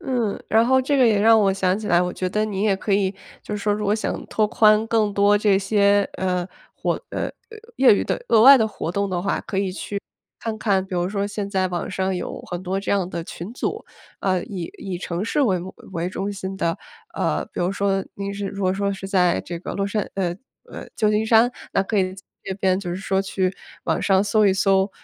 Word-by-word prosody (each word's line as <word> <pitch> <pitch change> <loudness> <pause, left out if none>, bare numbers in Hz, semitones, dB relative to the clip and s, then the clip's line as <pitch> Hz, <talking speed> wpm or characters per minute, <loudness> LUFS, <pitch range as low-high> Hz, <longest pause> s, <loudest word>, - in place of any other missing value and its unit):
嗯， 250 - -2
然 225 +1 +4
后 260 +1 +4
这 280 +2 0
个 255 -3 +5
也 215 -3 +3
让 225 0 +6
我 195 -1 +3
想 190 -1 +1
起 215 - -6
来， 175 - +4
我 180 0 -2
觉 185 - -2
得 210 +3 0
你 205 -2 -3
也 200 -3 +2
可 200 +1 -2
以， 195 -1 +2 0.3
就 210 - -4
是 200 - -7
说 210 - +2
如 210 0 -2
果 205 - +2
想 215 - -3
拓 215 -1 +1
宽 215 0 +4
更 220 -3 +1
多 205 +1 +4
这 200 -2 +3
些， 200 0 +3
呃， 180 -1 -1 0.3
活 - - -1 0.2
呃， - - -2 0.5
业 260 -5 +6
余 - - 0
的 - - -2
额 220 - +5
外 275 +1 +10
的 220 -1 +2
活 170 -4 -5
动 200 +1 0
的 180 -2 -1
话， 195 - -1
可 190 - -5
以 190 -2 -1
去， 200 +1 -4 0.4
看 225 -1 -4
看， 195 -3 +1
比 190 - -6
如 175 +1 0
说 200 0 -1
现 205 -1 -4
在 190 -2 +1
网 175 0 -3
上 190 0 -1
有 180 - -5
很 175 +1 -6
多 190 +1 -2
这 200 - -1
样 190 -3 +1
的 170 -2 -5
群 180 +7 -8
组， - - -3 0.4
呃， 185 -2 0
以 180 -5 -6
以 185 -3 -5
城 180 +1 -3
市 290 - 0
为 190 -8 +2
目 185 +2 -8 0.2
为 170 0 -2
中 195 +2 -3
心 190 0 -5
的。 165 -3 0 0.4
呃， 75 +1 0
比 - - -11
如 180 +2 +1
说 195 -1 0
您 200 0 -4
是 200 0 -4
如 200 0 -6
果 185 0 +2
说 200 0 -1
是 195 0 -7
在 180 -3 +2
这 170 -1 -6
个 - - -6
洛 200 0 -1
杉 205 0 -2
呃 180 -2 -1 0.3
呃， - - -8
旧 210 -1 +2
金 215 +1 +1
山， 230 +2 +5 0.2
那 - - +2
可 210 +2 -3
以 185 -1 +1
在 190 - -13 0.2
这 190 - -3
边 190 -1 +1
就 180 -3 -5
是 175 - -3
说 190 0 0
去 190 -1 -1 0.3
网 - - 0
上 195 -1 +3
搜 210 0 +3
一 190 - +4
搜， 195 0 +2
195 Hz, 260 characters per minute, -22 LUFS, 185-210 Hz, 0.5 s, 外